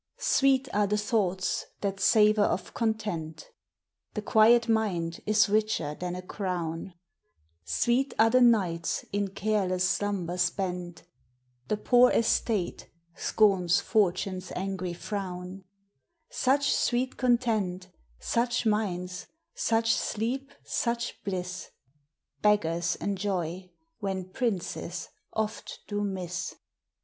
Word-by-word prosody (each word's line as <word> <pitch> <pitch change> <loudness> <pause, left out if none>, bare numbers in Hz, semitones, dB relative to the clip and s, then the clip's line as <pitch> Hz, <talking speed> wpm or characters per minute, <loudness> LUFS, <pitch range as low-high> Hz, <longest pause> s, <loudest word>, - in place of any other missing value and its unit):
Sweet 270 -1 +3
are 205 0 +2
the 210 +1 +1
thoughts 200 -4 0
that 195 -1 -2
savor 215 -1 +5
of 195 -2 0
content; 210 -9 -3 0.6
The 210 - -3
quiet 230 +2 +5
mind 190 -7 0
is 215 +1 +4
richer 210 -8 0
than 180 +3 -4
a 180 - -6
crown; 180 -2 -4 0.7
Sweet 245 - +1
are 225 +1 +5
the 255 +1 +5
nights 185 -8 +2
in 200 0 0
careless 190 -2 0
slumber 185 -3 -1
spent, 180 -2 -2 0.3
— 125 0 -42
The 210 - 0
poor 245 +3 +5
estate 220 -4 0 0.3
scorns 190 -5 +3
Fortune's 185 -3 0
angry 185 -1 -3
frown: 185 0 -6 0.7
Such 275 +2 +2
sweet 255 +1 0
content, 220 -7 0 0.3
such 240 +1 0
minds, 180 -4 -1 0.3
such 225 0 +2
sleep, 260 +6 -2
such 235 0 -2
bliss, 180 -2 -4 0.7
Beggars 175 -5 +2
enjoy, 185 -3 -3 0.3
when 190 -3 -4
princes 185 -6 -3 0.2
oft 220 0 -4
do 205 0 -2
miss. 180 -3 -4
200 Hz, 105 wpm, -28 LUFS, 180-220 Hz, 0.7 s, savor